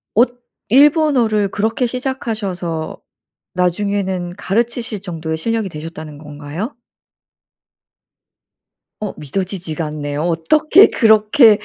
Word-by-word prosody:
엇 245 +2 +3 0.3
일본어를 260 -6 +4
그렇게 220 +5 0
시작하셔서 210 - -4 0.5
나중에는 185 0 -1
가르치실 230 +1 -1
정도의 160 -4 -4
실력이 225 +3 -1
되셨다는 155 -1 -8
건가요? 150 - -7 2.2
어 210 -2 -4
믿어지지가 170 +1 -4
않네요. 145 -1 -4
어떻게 300 - +5
그렇게 220 0 +5
200 Hz, 255 characters per minute, -18 LUFS, 165-230 Hz, 2.2 s, 어떻게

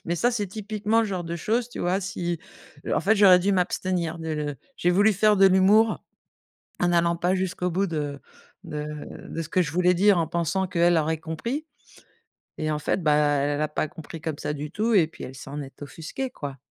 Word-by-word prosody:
Mais 170 - -1
ça, 245 +7 +2
c'est 210 -4 -2
typiquement 215 +2 -1
le 225 - 0
genre 185 -3 -3
de 170 +1 -4
chose, 230 +7 -1
tu - - -9
vois, 180 +2 +1
si, 175 -3 -3 0.5
heu, - - 0
en - - +1
fait, 205 +6 +3
j'aurais 195 -3 +7
dû 195 +3 +1
m'abstenir 180 -2 -1
de 160 0 -6
le 150 -2 -3 0.2
j'ai 175 - +2
voulu 205 +4 +4
faire 210 +2 +3
de 195 0 +7
l'humour 200 +4 +4 0.8
en 175 - +3
n'allant 170 0 +2
pas 180 +2 +1
jusqu'au 180 -1 -1
bout 190 +4 0
de 150 -5 -3 0.5
de 150 -3 -5 0.4
de 165 - -4
ce 155 - -8
que 180 +2 +2
je 150 - -3
voulais 180 +2 +3
dire, 195 +1 +4
en 165 - +1
pensant 170 +3 -1
qu'elle 175 -1 +3
aurait 160 0 +1
compris 230 - -4 0.9
et 155 0 -1
en 150 - -1
fait, 165 - -1
bah 150 -2 +4
elle 145 0 +1
a 155 - +1
pas 150 +1 -2
compris 160 +2 -10
comme 160 -3 -3
ça 150 - -3
du 150 +1 -6
tout 225 +4 0
et 175 -6 +5
puis 160 - -12
elle 130 - -8
s'en 145 +2 -7
est 140 +1 -11
offusquée, 165 - -5
quoi. 140 - -7
175 Hz, 220 wpm, -25 LUFS, 155-195 Hz, 0.9 s, j'aurais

